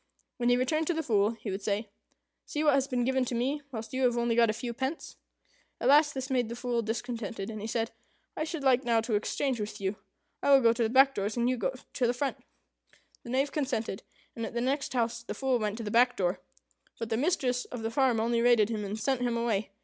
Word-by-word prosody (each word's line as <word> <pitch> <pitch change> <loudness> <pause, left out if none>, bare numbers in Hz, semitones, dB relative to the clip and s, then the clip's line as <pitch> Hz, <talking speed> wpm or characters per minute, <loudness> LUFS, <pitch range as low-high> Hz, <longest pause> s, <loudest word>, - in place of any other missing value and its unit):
When 240 -1 +1
he 245 - +4
returned 310 +5 0
to 345 - +1
the 320 - -1
Fool, 215 -4 +2
he 210 - -4
would 190 +2 -4
say, 205 +2 -1 0.6
"See 300 - -2
what 295 -2 +5
has 270 0 +2
been 250 -3 0
given 265 0 +2
to 245 - -3
me, 270 +5 -1
whilst 225 -1 -6
you 260 - -1
have 245 -2 +3
only 235 0 +1
got 230 -1 +4
a - - +4
few 235 +2 -4
pence." 265 +6 -4 0.6
At 245 - +1
last 295 +1 +5
this 265 +1 -4
made 245 -3 +1
the 235 - -5
Fool 240 -1 -1
discontented, 225 -2 -4
and 215 -1 -6
he 215 - -4
said, 225 0 -1 0.4
"I - - -1
should 320 -2 -4
like 260 -1 +4
now 230 -2 +2
to 225 0 -3
exchange 240 +4 0
with 210 0 -5
you. 195 +1 -2 0.4
I - - +1
will 275 -1 +7
go 230 -1 +5
to 235 - -3
the 225 - +2
back 270 +3 +6
doors, 205 +1 -2
and 240 0 +2
you 255 -1 0
to 255 +2 -2
the 245 - 0
front." 275 +2 -2 0.8
The - - -11
Knave 270 +3 +1
consented, 250 -9 -2 0.3
and 230 - -4
at 225 - -5
the - - +1
next 270 +2 -1
house 235 -1 0
the 235 - -6
Fool 265 -2 +1
went 210 -1 -2
to 230 - -5
the 210 - -4
back 245 +2 +4
door; 180 -1 0 0.6
but 230 -1 -4
the - - +2
mistress 250 -3 0
of 245 -3 -7
the 225 - -2
farm 255 -2 +2
only 230 +1 +1
rated 235 -3 +4
him, 215 -2 -2
and 205 +1 -4
sent 265 +2 0
him 240 -1 0
away. 220 -4 0
240 Hz, 250 wpm, -29 LUFS, 225-265 Hz, 0.8 s, will